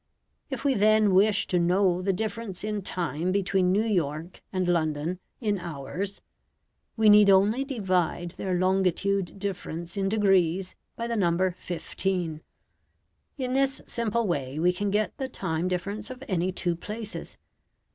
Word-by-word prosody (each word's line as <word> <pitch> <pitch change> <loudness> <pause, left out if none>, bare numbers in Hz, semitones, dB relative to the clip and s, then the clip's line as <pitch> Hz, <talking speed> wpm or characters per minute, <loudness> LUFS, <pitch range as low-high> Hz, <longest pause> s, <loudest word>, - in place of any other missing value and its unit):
If 265 -1 -5
we 275 - +4
then 215 -2 +4
wish 205 +2 +4
to 180 - +1
know 180 +1 +2
the 195 +1 +1
difference 210 0 -3
in 210 -1 -2
time 175 -2 -2
between 190 -1 +2
New 210 +4 +2
York 170 -4 -2
and 185 -2 -1
London 160 0 0 0.2
in 210 -4 0
hours, 175 +5 -5 0.8
we 220 -1 +4
need 210 -1 +8
only 205 +7 +4
divide 185 - -1
their 185 0 -2
longitude 190 +1 +1
difference 175 -3 -4
in 195 -1 +1
degrees 190 -3 +2 0.2
by 235 - -3
the 235 0 -2
number 185 -2 +2
15. 175 -2 -3 1.0
In 255 -2 -2
this 270 0 +2
simple 235 0 -1
way 140 -6 -2
we 175 +3 +3
can 205 +3 -2
get 210 +2 0
the 265 -1 -2
time 165 -7 -2
difference 200 +4 -3
of 255 +1 -8
any 185 -2 0
two 175 -1 -1
places. 210 +5 -7
190 Hz, 145 wpm, -27 LUFS, 175-210 Hz, 1.0 s, need